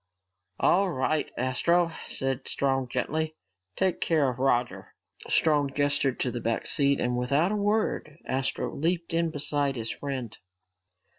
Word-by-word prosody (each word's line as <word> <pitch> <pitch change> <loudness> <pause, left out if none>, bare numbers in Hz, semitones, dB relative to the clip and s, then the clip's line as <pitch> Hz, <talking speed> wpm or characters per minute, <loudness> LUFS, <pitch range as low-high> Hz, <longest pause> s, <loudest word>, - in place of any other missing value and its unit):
"All 195 +2 +4
right, 150 0 0
Astro," 165 +7 +2 0.2
said 135 0 -2
Strong 135 -2 +1
gently, 155 +6 -2 0.4
"take 190 -2 +1
care 155 -5 +3
of 125 - -10
Roger." 125 -2 0 0.3
Strong 145 -3 +2
gestured 145 -2 +1
to 125 - 0
the 120 - -4
back 115 0 -1
seat 140 -2 +2
and 125 0 0
without 140 +9 +1
a - - 0
word 205 -7 0
Astro 135 0 -2
leaped 170 +2 -1
in 165 0 +2
beside 145 -2 0
his 115 -2 -3
friend. 130 -5 -5
140 Hz, 140 wpm, -27 LUFS, 130-165 Hz, 0.4 s, All